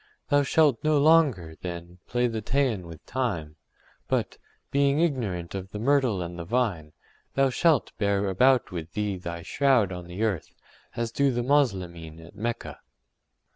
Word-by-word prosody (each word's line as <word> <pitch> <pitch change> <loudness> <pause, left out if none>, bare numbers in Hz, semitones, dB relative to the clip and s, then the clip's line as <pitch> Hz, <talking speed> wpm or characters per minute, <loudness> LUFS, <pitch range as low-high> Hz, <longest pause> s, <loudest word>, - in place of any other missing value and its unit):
Thou 145 0 +4
shalt 145 -3 +3
no 155 -1 +3
longer, 140 - +4
then, 85 0 -7
play 120 +1 +1
the 115 -2 -2
Teian 115 -6 0
with 80 -2 -12
time, 95 -12 -3 0.5
but, - - -1 0.3
being 140 +1 +2
ignorant 110 - -1
of 95 -1 -5
the 105 - -7
myrtle 120 -5 +2
and 85 0 -7
the - - -4
vine, 90 -7 -1 0.4
thou 135 -1 +3
shalt 160 0 +2
bear 100 -1 +1
about 125 +7 +3
with 85 -2 -6
thee 105 -2 -1
thy 85 -1 -6
shroud 130 -4 +2
on 90 -1 -7
the 90 +5 -4
earth, 100 -8 -2 0.4
as 115 -1 -2
do 140 0 +2
the 120 -1 -1
Moslemin 90 - 0
at 85 +3 -14
Mecca. 115 +3 -4
105 Hz, 160 wpm, -26 LUFS, 90-135 Hz, 0.5 s, Thou